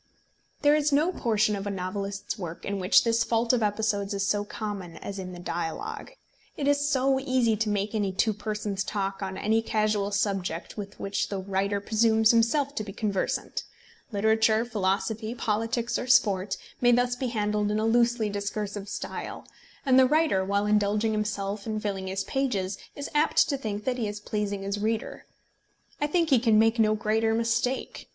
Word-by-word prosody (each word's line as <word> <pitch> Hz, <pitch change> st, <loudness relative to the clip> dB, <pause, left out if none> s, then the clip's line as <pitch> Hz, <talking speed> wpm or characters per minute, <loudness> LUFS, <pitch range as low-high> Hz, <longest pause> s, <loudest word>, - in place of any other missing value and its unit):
There 290 Hz, 0 st, +6 dB
is 300 Hz, 0 st, +2 dB
no 305 Hz, +5 st, +3 dB
portion 215 Hz, -, +1 dB
of 200 Hz, 0 st, -4 dB
a -, -, -1 dB
novelist's 195 Hz, +2 st, -4 dB
work 175 Hz, -5 st, -7 dB
in 200 Hz, 0 st, -2 dB
which 185 Hz, +1 st, +5 dB
this 230 Hz, 0 st, +2 dB
fault 230 Hz, +1 st, +1 dB
of 245 Hz, -, +2 dB
episodes 205 Hz, -1 st, 0 dB
is 195 Hz, 0 st, 0 dB
so 205 Hz, +1 st, +1 dB
common 200 Hz, -5 st, -6 dB
as 200 Hz, -1 st, -6 dB
in 185 Hz, -1 st, -6 dB
the 180 Hz, -, -8 dB
dialogue. 170 Hz, -, -4 dB, 0.4 s
It 280 Hz, -, -1 dB
is 285 Hz, 0 st, +2 dB
so 265 Hz, -1 st, +2 dB
easy 255 Hz, -4 st, +2 dB
to 220 Hz, 0 st, 0 dB
make 205 Hz, +1 st, -1 dB
any 205 Hz, -3 st, 0 dB
two 215 Hz, +4 st, +1 dB
persons 210 Hz, -1 st, -3 dB
talk 195 Hz, -1 st, -3 dB
on 190 Hz, -1 st, -4 dB
any 220 Hz, +1 st, +2 dB
casual 215 Hz, -2 st, 0 dB
subject 195 Hz, -4 st, -2 dB
with 205 Hz, -1 st, -7 dB
which 200 Hz, 0 st, -2 dB
the 200 Hz, -, -3 dB
writer 195 Hz, +1 st, -1 dB
presumes 220 Hz, +1 st, +3 dB
himself 255 Hz, +5 st, +2 dB
to 215 Hz, -, -3 dB
be 205 Hz, -, -7 dB
conversant! 205 Hz, -2 st, -2 dB, 0.5 s
Literature, 220 Hz, +2 st, +3 dB
philosophy, 215 Hz, +1 st, -1 dB
politics, 230 Hz, +1 st, -1 dB
or 250 Hz, -, -4 dB
sport, 200 Hz, -6 st, +3 dB, 0.2 s
may 245 Hz, 0 st, +5 dB
thus 245 Hz, +1 st, +2 dB
be 255 Hz, +1 st, -2 dB
handled 210 Hz, -2 st, 0 dB
in 210 Hz, -, 0 dB
a 215 Hz, -, 0 dB
loosely 235 Hz, -1 st, +3 dB
discursive 205 Hz, 0 st, -4 dB
style; -, -, -6 dB, 0.4 s
and 260 Hz, -1 st, +5 dB
the 260 Hz, -, +6 dB
writer, 300 Hz, -10 st, +2 dB
while 200 Hz, +2 st, 0 dB
indulging 210 Hz, +1 st, +2 dB
himself 210 Hz, -1 st, -2 dB
and 215 Hz, -1 st, -2 dB
filling 195 Hz, -2 st, -3 dB
his 190 Hz, +1 st, -2 dB
pages, 200 Hz, -7 st, -1 dB, 0.2 s
is 285 Hz, -, -5 dB
apt 300 Hz, +1 st, +3 dB
to 285 Hz, -, 0 dB
think 210 Hz, -6 st, -4 dB
that 255 Hz, +1 st, -1 dB
he 220 Hz, -, 0 dB
is 205 Hz, 0 st, -5 dB
pleasing 205 Hz, -1 st, -3 dB
his 200 Hz, +1 st, -2 dB
reader. 220 Hz, +2 st, -3 dB, 0.7 s
I 295 Hz, -, +2 dB
think 330 Hz, 0 st, +1 dB
he 260 Hz, -, +6 dB
can 225 Hz, -2 st, +3 dB
make 225 Hz, +2 st, +3 dB
no 215 Hz, -1 st, +4 dB
greater 220 Hz, +1 st, +1 dB
mistake. 230 Hz, +3 st, -1 dB
215 Hz, 185 wpm, -27 LUFS, 200-235 Hz, 0.7 s, There